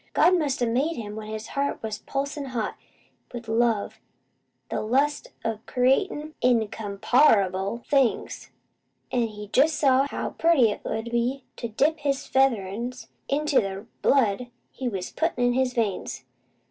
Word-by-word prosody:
God 365 - +5
must 280 -5 0
a - - +4
made 265 +8 0
him 210 -2 -6
when 215 -1 -7
his 215 0 -6
heart 280 -3 -2
was 220 -1 -4
pulsin' 280 +1 -3
hot 245 -5 -3 0.6
with 240 -2 -7
love 225 -2 +1 0.7
an' - - -1
the - - -1
lust 275 +7 +1 0.2
o' 225 -2 -1
creatin' 295 +4 +1
in 235 -3 +3
com 205 -2 -6
PAR 225 0 +5
able 190 +5 -4
things; 270 -5 +1 0.6
an' 240 -2 +1
He 210 -1 -9
jest 295 +7 +3
saw 270 -1 +4
how - - -4
pretty 310 -10 +4
it - - -6
'ud 225 +1 -3
be 245 +3 0
to 235 - -3
dip 290 +8 +1
his 280 -2 -1
featherin' 235 -3 +1 0.4
into 295 +1 +2
the 195 +1 -5 0.2
blood 245 -3 +2 0.2
He 255 -2 -3
was 190 -4 -4
puttin' 320 -7 -1
in 245 0 +3
his 255 0 0
veins. 195 - -2
245 Hz, 160 wpm, -25 LUFS, 220-275 Hz, 0.7 s, God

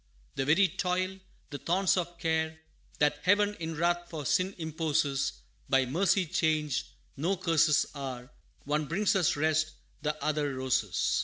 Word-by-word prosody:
The 135 - -1
very 170 +7 +5
toil, 185 +1 -2 0.3
the 145 - -5
thorns 185 +2 +2
of 175 -1 -3
care, 160 -1 -1 0.4
That 145 0 +2
Heaven 205 +3 +3
in 160 -1 -4
wrath 175 +2 0
for 155 -4 -6
sin 185 +8 +1
imposes, 155 -4 0 0.4
By 135 -1 +4
mercy 185 +7 +2
changed, 155 -3 0 0.3
no 175 +7 0
curses 165 -4 +3
are 130 -2 -6 0.3
One 150 +2 0
brings 200 +6 +1
us 180 -5 +3
rest, 155 +1 +1 0.3
the 150 0 -2
other 150 -2 0
roses. 130 -6 0
160 Hz, 145 wpm, -30 LUFS, 145-180 Hz, 0.4 s, very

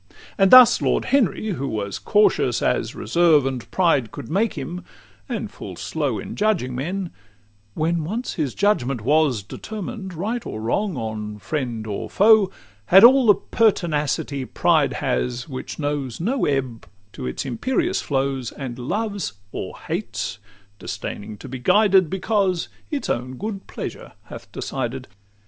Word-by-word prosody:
XVI - - -25 0.2
And 195 -1 +5
thus 255 -2 +9
Lord - - +1
Henry, 230 -5 +1
who 140 -8 -2
was 100 -5 -3
cautious 210 0 +2
as - - 0
Reserve 165 -5 +3
and 130 -3 -4
pride 155 - +2
could 115 - -8
make 205 +6 +1
him, 170 +5 -5 0.5
and - - -3
full - - -8
slow - - -2
In - - -7
judging 195 -12 0
men 175 +8 -3 0.6
when 165 +1 0
once 220 +10 -3
his 145 -6 -2
judgment 135 - +1
was 140 -3 +2
Determined, 200 - -7
right 220 +8 -2
or 110 - -6
wrong, 175 - -1
on 105 -2 -4
friend 120 -3 -3
or 105 -2 -4
foe, 210 -1 +5 0.4
Had 195 +3 +8
all 255 +1 +8
the 205 - +8
pertinacity 150 -11 0
pride 150 -1 +2
has, 125 -2 -2
Which 130 -4 -6
knows 145 -5 -3
no 235 +10 0
ebb 130 -5 -2 0.3
to 65 - -5
its 65 - -4
imperious 265 - -1
flow, 135 -1 -1 0.2
And 130 -3 -6
loves 200 - -2 0.2
or - - -6
hates, - - -4 0.4
disdaining 105 +1 -6
to - - -10
be 130 0 -6
guided, 190 - +4
Because 190 -2 0 0.2
its 290 -2 -3
own 125 +2 -2
good 200 -1 -5
pleasure - - -7
hath - - -11
decided. 130 0 -4
155 Hz, 150 wpm, -22 LUFS, 130-205 Hz, 0.6 s, thus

